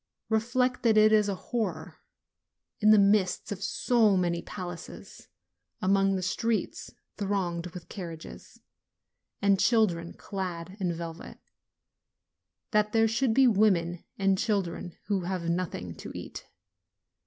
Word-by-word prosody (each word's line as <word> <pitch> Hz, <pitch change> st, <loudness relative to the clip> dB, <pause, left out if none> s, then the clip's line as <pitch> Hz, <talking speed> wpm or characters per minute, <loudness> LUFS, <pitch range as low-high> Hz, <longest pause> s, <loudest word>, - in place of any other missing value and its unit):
Reflect, 245 Hz, +3 st, +1 dB
that 225 Hz, -2 st, +3 dB
it 215 Hz, 0 st, +6 dB
is 210 Hz, -1 st, +4 dB
a 195 Hz, -, -1 dB
horror, 230 Hz, +3 st, -4 dB, 0.8 s
in 215 Hz, -, +4 dB
the 215 Hz, -, +8 dB
midst 200 Hz, -2 st, +2 dB
of 200 Hz, -1 st, -4 dB
so 210 Hz, 0 st, +2 dB
many 170 Hz, -1 st, 0 dB
palaces, 175 Hz, -3 st, -9 dB, 0.5 s
along 195 Hz, +1 st, +2 dB
the 185 Hz, -, -2 dB
streets 225 Hz, +4 st, -2 dB, 0.3 s
thronged 185 Hz, -4 st, -2 dB
with 175 Hz, 0 st, -10 dB
carriages, 170 Hz, -5 st, -9 dB, 0.8 s
and 200 Hz, -1 st, +4 dB
children 185 Hz, -8 st, +2 dB
clad 185 Hz, -2 st, -5 dB
in 180 Hz, -3 st, 0 dB
velvet, 165 Hz, 0 st, -7 dB, 1.3 s
that 210 Hz, -1 st, +2 dB
there 225 Hz, 0 st, +4 dB
should 225 Hz, +1 st, +1 dB
be 270 Hz, -, +6 dB
women 190 Hz, -7 st, +2 dB
and 195 Hz, -1 st, +2 dB
children 180 Hz, -5 st, -2 dB
who 190 Hz, -3 st, -1 dB
have 180 Hz, -2 st, -3 dB
nothing 170 Hz, -, -3 dB
to -, -, -8 dB
eat. -, -, -8 dB
195 Hz, 125 wpm, -28 LUFS, 175-215 Hz, 1.3 s, the